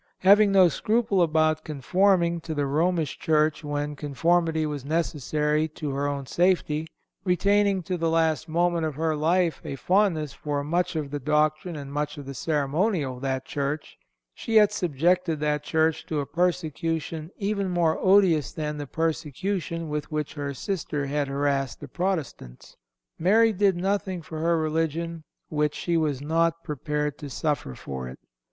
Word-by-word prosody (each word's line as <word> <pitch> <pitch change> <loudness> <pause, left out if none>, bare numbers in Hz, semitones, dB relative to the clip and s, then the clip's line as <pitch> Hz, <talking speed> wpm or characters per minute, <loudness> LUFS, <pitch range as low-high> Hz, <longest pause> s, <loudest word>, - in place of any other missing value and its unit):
"Having 200 +2 +6
no 190 -2 +7
scruple 215 +2 +1
about 155 -1 +2
conforming 170 +3 +2
to 160 -1 -5
the 145 -1 0
Romish 160 +1 0
Church 155 0 +1
when 145 0 -3
conformity 160 +3 +1
was 145 -3 -4
necessary 150 0 0
to 155 -1 -5
her 140 +1 -1
own 140 -1 -3
safety, 160 -1 +1 0.4
retaining 200 +1 +2
to 180 +2 -2
the 165 -1 0
last 160 0 +1
moment 170 +1 +1
of 155 -3 -2
her 160 +1 0
life 165 +2 +1
a - - -5
fondness 175 -3 +1
for 145 -1 -3
much 170 +4 0
of 150 -3 -3
the 145 - -3
doctrine 155 +4 +1
and 140 -1 -7
much 150 0 -2
of 145 - -8
the 140 - -6
ceremonial 150 - 0
of - - -12
that 130 -1 -2
Church, 145 +2 -3 0.4
she 225 - -4
yet 210 -1 +7
subjected 175 -1 +1
that 150 0 0
Church 160 +1 +1
to 155 - -1
a 140 - -2
persecution 165 -1 -2
even 200 -1 -1
more 170 -3 +1
odious 185 -6 +4
than 150 -1 -4
the 145 - -5
persecution 165 +2 -2
with 150 0 -4
which 150 -1 -2
her 145 -2 -4
sister 155 -3 -3
had 145 +1 -1
harassed 140 -1 -1
the - - -8
Protestants. 160 - -4 0.4
Mary... 220 +6 +4
did 200 -1 +3
nothing 190 -1 -1
for 160 0 -7
her 170 +1 +2
religion 165 +1 -1 0.3
which 150 -1 0
she 170 - -1
was 150 -5 0
not 165 +2 +1
prepared 150 -1 -3
to 145 -3 -7
suffer 145 - -2
for 65 -1 -6
it. 65 - -9
160 Hz, 160 wpm, -26 LUFS, 145-175 Hz, 0.4 s, no